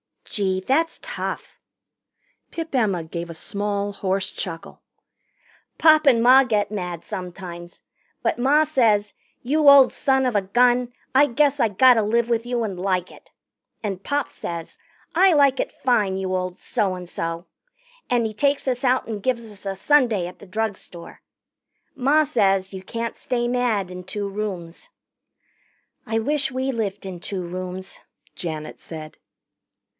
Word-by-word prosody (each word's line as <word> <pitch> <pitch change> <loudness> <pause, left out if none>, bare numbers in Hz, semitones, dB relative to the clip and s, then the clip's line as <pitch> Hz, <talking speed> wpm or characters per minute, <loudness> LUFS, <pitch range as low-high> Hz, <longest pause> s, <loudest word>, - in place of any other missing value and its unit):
"Gee, 190 -2 -1
that's 310 - +1
tough." - - -5 0.9
Pip 325 -2 -6
Emma 205 -9 +1
gave 170 +1 -6
a - - -6
small 200 +4 -3
hoarse 195 -1 -2
chuckle. 165 -3 -7 1.0
"Pop 310 -1 +6
and 230 -4 +5
Ma 260 +2 +8
get 210 -4 0
mad 180 -5 -4
sometimes. 175 -1 -8 0.4
But - - 0
Ma 285 +5 +4
says, 225 -9 +2 0.3
'You 290 +3 +4
old 275 -2 +8
son 265 -2 +1
of 250 -3 0
a 205 - +3
gun, 245 +4 +2 0.2
I 275 +3 +6
guess 285 +2 +2
I 230 - +4
gotter 235 +3 +5
live 230 +3 +1
with 230 0 0
you 240 -1 -1
and 195 -5 -4
like 185 -1 -1
it.' - - -17 0.5
And 195 -3 -3
Pop 285 -2 -1
says, 170 -1 -7 0.4
'I 370 +1 +6
like 280 -3 +4
it - - -1
fine, 210 -7 +1
you 190 -1 -2
old 185 0 -3
so 205 -6 -1
and 180 -1 -8
so.' 165 +1 -4 0.6
And 240 -2 +2
he 220 - -3
takes 280 +6 0
us 250 +1 -2
out 255 +1 +2
and 215 -3 -4
gives 235 -2 -2
us 200 -1 -13
a 195 - -2
sundae 235 -5 +3
at 180 - -11
the 200 - -13
drugstore. 195 -4 -5 0.7
Ma 285 +3 +3
says 195 -7 +1
you 190 - -6
can't 230 +4 -5
stay 240 -1 -1
mad 240 -7 0
in 180 0 -8
two 205 +2 -4
rooms." 195 -5 -6 1.2
"I 225 +1 0
wish 285 +3 +1
we 260 +1 -1
lived 210 -5 -3
in 185 -2 -6
two 185 +1 -4
rooms," 185 +1 -6 0.3
Janet 155 -3 -6
said. 155 -2 -9
215 Hz, 155 wpm, -23 LUFS, 185-255 Hz, 1.2 s, Ma